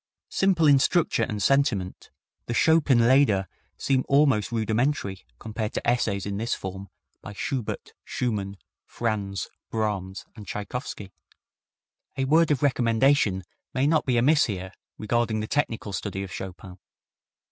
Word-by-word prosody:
Simple 190 Hz, -4 st, +2 dB
in 140 Hz, -2 st, +6 dB
structure 165 Hz, -4 st, +2 dB
and 105 Hz, -3 st, -1 dB
sentiment, 120 Hz, -9 st, +1 dB, 0.4 s
the 120 Hz, -, -2 dB
Chopin 140 Hz, -8 st, +4 dB
lieder 120 Hz, -8 st, +4 dB, 0.3 s
seem 130 Hz, -2 st, +1 dB
almost 135 Hz, -8 st, +3 dB
rudimentary 110 Hz, -2 st, -1 dB
compared 110 Hz, -, -4 dB
to -, -, -3 dB
essays 100 Hz, -5 st, +1 dB
in 100 Hz, 0 st, -3 dB
this 115 Hz, +3 st, -1 dB
form 95 Hz, +1 st, -7 dB, 0.3 s
by 100 Hz, -, -9 dB
Schubert, 125 Hz, +2 st, -4 dB
Schumann, 100 Hz, -5 st, -3 dB, 0.3 s
Franz, 100 Hz, -4 st, -2 dB, 0.2 s
Brahms 100 Hz, -4 st, -3 dB
and 105 Hz, -3 st, -11 dB
Tschaikowsky. 105 Hz, -1 st, -5 dB, 1.1 s
A 135 Hz, -, +1 dB
word 160 Hz, +4 st, +4 dB
of 145 Hz, -1 st, +1 dB
recommendation 120 Hz, -6 st, +2 dB, 0.3 s
may 130 Hz, +1 st, +2 dB
not 155 Hz, 0 st, +2 dB
be 125 Hz, -2 st, +2 dB
amiss 150 Hz, +6 st, +4 dB
here 95 Hz, -3 st, -5 dB, 0.2 s
regarding 115 Hz, 0 st, 0 dB
the 110 Hz, -, -2 dB
technical 115 Hz, -6 st, -2 dB
study 95 Hz, 0 st, -3 dB
of 95 Hz, -, -8 dB
Chopin. 90 Hz, 0 st, -8 dB
115 Hz, 135 wpm, -26 LUFS, 100-135 Hz, 1.1 s, in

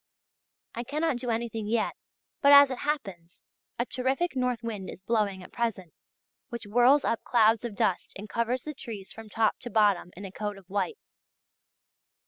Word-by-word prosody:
I 235 Hz, -, -4 dB
cannot 300 Hz, +2 st, -1 dB
do 245 Hz, 0 st, -4 dB
anything 225 Hz, -2 st, -2 dB
yet 220 Hz, 0 st, 0 dB, 0.5 s
but, 280 Hz, -, +6 dB
as 285 Hz, -1 st, +9 dB
it 255 Hz, -, -4 dB
happens, 195 Hz, -, -4 dB, 0.3 s
a 240 Hz, -, 0 dB
terrific 265 Hz, +7 st, -1 dB
north 250 Hz, -3 st, -1 dB
wind 210 Hz, -5 st, -5 dB
is 185 Hz, -, -10 dB
blowing 205 Hz, -4 st, 0 dB
at -, -, -13 dB
present, 220 Hz, -8 st, -3 dB, 0.6 s
which 235 Hz, -2 st, -6 dB
whirls 245 Hz, +7 st, +4 dB
up 230 Hz, -, 0 dB
clouds 225 Hz, -1 st, +3 dB
of 235 Hz, -4 st, -5 dB
dust 190 Hz, -2 st, 0 dB
and 205 Hz, +2 st, -8 dB
covers 235 Hz, +3 st, -1 dB
the 305 Hz, -, -5 dB
trees 220 Hz, -8 st, -8 dB
from 225 Hz, -1 st, -11 dB
top 220 Hz, 0 st, +1 dB
to 245 Hz, -, -6 dB
bottom 205 Hz, -6 st, +3 dB
in 200 Hz, -, -7 dB
a 190 Hz, -, -7 dB
coat 205 Hz, +1 st, -4 dB
of 195 Hz, -, -15 dB
white. 205 Hz, -, -1 dB
230 Hz, 175 wpm, -28 LUFS, 205-250 Hz, 0.6 s, as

